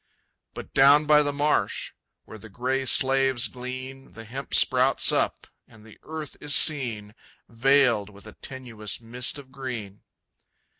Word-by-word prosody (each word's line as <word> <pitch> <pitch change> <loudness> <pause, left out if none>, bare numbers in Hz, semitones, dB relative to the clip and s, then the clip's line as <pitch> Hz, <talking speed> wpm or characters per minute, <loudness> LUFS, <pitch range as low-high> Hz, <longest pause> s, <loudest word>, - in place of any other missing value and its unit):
But - - -10
down 145 +3 +5
by 150 0 +5
the 145 -1 -1
marsh, 145 +1 -1 0.3
where 110 - -12
the 110 - -13
gray 130 +5 -2
slaves 135 -1 +2
glean, 130 +1 -9
The 115 - -11
hemp 130 +5 -5
sprouts - - +3
up, - - -1 0.2
and 110 -1 -18
the 110 - -17
earth 155 -1 -8
is 145 -1 0
seen 115 -9 +1 0.3
Veiled 120 -3 +2
with 100 0 -16
a 110 - -11
tenuous 120 -6 -8
mist 120 +4 -1
of 135 -2 -13
green. 120 -7 -7
130 Hz, 145 wpm, -25 LUFS, 115-135 Hz, 0.3 s, down